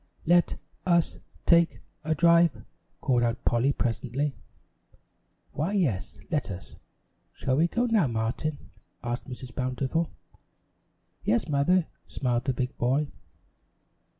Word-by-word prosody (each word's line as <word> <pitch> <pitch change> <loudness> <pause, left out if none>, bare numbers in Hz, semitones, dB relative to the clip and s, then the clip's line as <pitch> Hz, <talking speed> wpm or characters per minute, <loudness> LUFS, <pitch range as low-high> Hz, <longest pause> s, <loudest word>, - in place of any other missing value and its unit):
"Let 175 +1 +4 0.3
us 170 -2 +2 0.3
take 170 -1 +4 0.2
a 160 0 +1
drive," 170 -1 +4 0.4
called 125 -2 +2
out 115 -1 -1
Polly 120 +4 +3
presently. 130 +3 -1 1.2
"Why, 165 +7 -1
yes, 135 - 0
let 150 -7 0
us. 95 -1 -8 0.6
Shall 130 - 0
we 165 +3 +4
go 240 +7 0
now, 220 - +3
Martin?" 120 +6 -3 0.3
asked 120 +2 -3
Mrs. 125 -1 -8
Bountiful. 130 +6 -1 1.1
"Yes, 115 +2 +2
Mother," 155 +5 +3 0.2
smiled 125 -2 -1
the 135 - +1
big 125 +1 -2
boy. 135 +5 +1
140 Hz, 115 wpm, -28 LUFS, 120-170 Hz, 1.2 s, Let